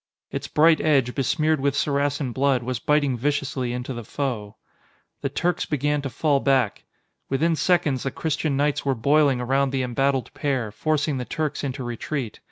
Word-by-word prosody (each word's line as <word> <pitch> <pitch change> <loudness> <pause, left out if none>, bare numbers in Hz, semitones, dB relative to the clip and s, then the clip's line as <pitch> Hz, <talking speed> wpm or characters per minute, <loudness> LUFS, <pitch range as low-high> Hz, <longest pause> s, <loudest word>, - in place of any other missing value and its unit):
Its - - -4
bright 160 +1 +4
edge, 135 -5 +2
besmeared 155 +3 +1
with 140 0 0
Saracen 145 -2 0
blood, 135 0 +1
was 125 -1 -3
biting 145 -1 +2
viciously 135 -1 -1
into 125 +2 -4
the 120 -1 -6
foe. 110 -4 -4 0.7
The 140 - -1
Turks 175 +5 0
began 145 0 0
to 140 - -4
fall 145 +1 +1
back. 135 -6 +1 0.4
Within 160 +5 +2
seconds, 155 -7 +2
the 135 - -1
Christian 150 0 -1
knights 145 0 +1
were 135 -1 +1
boiling 140 +2 +3
around 135 +3 +1
the 130 -1 -1
embattled 135 +1 0
pair, 130 -7 -1
forcing 150 +3 0
the 125 - -4
Turks 150 0 -3
into 130 -1 -3
retreat. 120 +1 -4
140 Hz, 170 wpm, -24 LUFS, 130-150 Hz, 0.7 s, bright